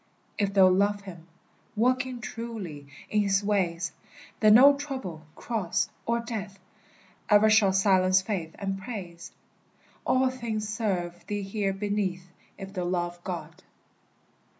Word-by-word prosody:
If 200 Hz, -1 st, 0 dB
thou 190 Hz, -1 st, +7 dB
love 200 Hz, +2 st, +2 dB
him, 175 Hz, -4 st, -11 dB, 0.5 s
Walking 255 Hz, +2 st, +1 dB
truly 215 Hz, -12 st, -6 dB, 0.2 s
in 210 Hz, -, +3 dB
his 200 Hz, 0 st, +1 dB
ways, 185 Hz, -4 st, 0 dB, 0.5 s
Then 215 Hz, -1 st, +7 dB
no 280 Hz, +4 st, +8 dB
trouble, 260 Hz, -, -6 dB
cross, 215 Hz, -8 st, -1 dB, 0.2 s
or 235 Hz, 0 st, +1 dB
death 215 Hz, -4 st, -6 dB, 0.7 s
E'er 210 Hz, +1 st, +6 dB
shall 215 Hz, -3 st, +5 dB
silence 190 Hz, -1 st, +4 dB
faith 190 Hz, -5 st, -4 dB
and 195 Hz, -2 st, -3 dB
praise; 185 Hz, -6 st, -7 dB, 0.7 s
All 260 Hz, 0 st, +2 dB
things 225 Hz, -4 st, -4 dB
serve 195 Hz, -6 st, -2 dB
thee 205 Hz, -1 st, -2 dB
here 195 Hz, 0 st, -1 dB
beneath, 195 Hz, -3 st, -2 dB, 0.3 s
If 195 Hz, -1 st, -8 dB
thou 180 Hz, -3 st, -2 dB
love 175 Hz, -1 st, -2 dB
God. 170 Hz, -1 st, -6 dB
200 Hz, 125 wpm, -27 LUFS, 185-220 Hz, 0.7 s, no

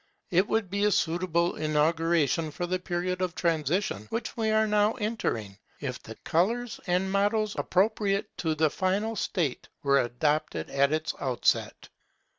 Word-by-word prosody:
It 185 Hz, +3 st, +3 dB
would 215 Hz, -5 st, 0 dB
be 200 Hz, +1 st, 0 dB
a -, -, +5 dB
suitable 170 Hz, 0 st, +1 dB
inauguration 160 Hz, +1 st, +1 dB
of 175 Hz, -1 st, -1 dB
the 185 Hz, -, +1 dB
period 180 Hz, 0 st, -2 dB
of 180 Hz, -2 st, -1 dB
transition 160 Hz, -, 0 dB
which 230 Hz, -, -3 dB
we 220 Hz, -2 st, 0 dB
are 220 Hz, 0 st, +3 dB
now 210 Hz, 0 st, +3 dB
entering, 115 Hz, -, -3 dB, 0.2 s
if 125 Hz, -3 st, -4 dB
the 110 Hz, -, -10 dB
colours 225 Hz, +8 st, 0 dB
and 180 Hz, +2 st, +1 dB
mottoes 205 Hz, +2 st, +1 dB
appropriate 200 Hz, +1 st, 0 dB
to 160 Hz, -2 st, 0 dB
the 155 Hz, -1 st, +2 dB
final 200 Hz, +4 st, 0 dB
state 170 Hz, -9 st, -2 dB, 0.2 s
were 140 Hz, -1 st, +4 dB
adopted 145 Hz, +6 st, -1 dB
at 140 Hz, +1 st, +3 dB
its 155 Hz, +1 st, -1 dB
outset. 130 Hz, -3 st, 0 dB
175 Hz, 150 wpm, -28 LUFS, 155-205 Hz, 0.2 s, a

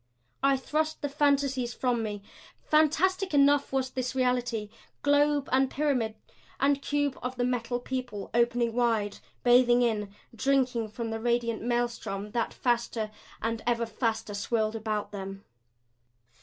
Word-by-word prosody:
I 275 Hz, 0 st, +4 dB
thrust 310 Hz, +4 st, -2 dB
the 290 Hz, -, 0 dB
fantasies 275 Hz, -4 st, +1 dB
from 245 Hz, -3 st, 0 dB
me. 205 Hz, -2 st, -4 dB, 0.4 s
Fantastic 325 Hz, +4 st, +2 dB
enough 285 Hz, 0 st, +4 dB
was 260 Hz, -1 st, 0 dB
this 255 Hz, 0 st, -3 dB
reality 245 Hz, -4 st, 0 dB, 0.3 s
globe 290 Hz, 0 st, +3 dB
and 265 Hz, 0 st, +3 dB
pyramid 260 Hz, -8 st, 0 dB, 0.4 s
and 280 Hz, 0 st, +2 dB
cube 290 Hz, -1 st, -1 dB
of 250 Hz, +1 st, -4 dB
the 245 Hz, -, -1 dB
Metal 245 Hz, -1 st, -1 dB
People 245 Hz, -5 st, -5 dB
opening 235 Hz, 0 st, +2 dB
wide, 225 Hz, -4 st, +1 dB, 0.2 s
bathing 245 Hz, 0 st, +5 dB
in, 210 Hz, -4 st, 0 dB, 0.2 s
drinking 250 Hz, -2 st, +1 dB
from 225 Hz, +1 st, -5 dB
the 225 Hz, -, -3 dB
radiant 235 Hz, -1 st, 0 dB
maelstrom 235 Hz, -4 st, -2 dB
that 235 Hz, 0 st, -1 dB
faster 235 Hz, -3 st, -1 dB, 0.3 s
and 225 Hz, 0 st, -1 dB
ever 235 Hz, -1 st, +2 dB
faster 225 Hz, -1 st, -2 dB
swirled 215 Hz, +2 st, 0 dB
about 215 Hz, -1 st, -2 dB
them. 195 Hz, -1 st, -7 dB
245 Hz, 135 wpm, -28 LUFS, 225-270 Hz, 0.4 s, bathing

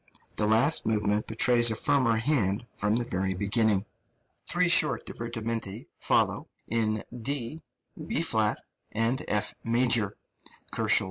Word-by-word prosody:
The 105 Hz, -, +1 dB
last 115 Hz, +8 st, +3 dB
movement 105 Hz, -1 st, 0 dB
betrays 120 Hz, +1 st, +3 dB
a 110 Hz, -, -1 dB
firmer 120 Hz, 0 st, +3 dB
hand 110 Hz, -4 st, +1 dB
from 105 Hz, +1 st, 0 dB
the 120 Hz, -, 0 dB
very 95 Hz, -4 st, -2 dB
beginning. 105 Hz, 0 st, +1 dB, 0.6 s
Three 180 Hz, +1 st, +2 dB
short 155 Hz, -3 st, +3 dB
divermenti 115 Hz, -2 st, -5 dB
follow, -, -, +1 dB, 0.2 s
in 110 Hz, -1 st, -1 dB, 0.2 s
D, 140 Hz, +4 st, -3 dB, 0.5 s
B -, -, 0 dB
flat, -, -, 0 dB, 0.3 s
and 115 Hz, +4 st, 0 dB
F 105 Hz, 0 st, 0 dB
major 120 Hz, -1 st, +3 dB, 0.7 s
(136 -, -, -6 dB
138, 110 Hz, -1 st, -1 dB
K.) 115 Hz, -, +7 dB
115 Hz, 135 wpm, -27 LUFS, 105-120 Hz, 0.7 s, K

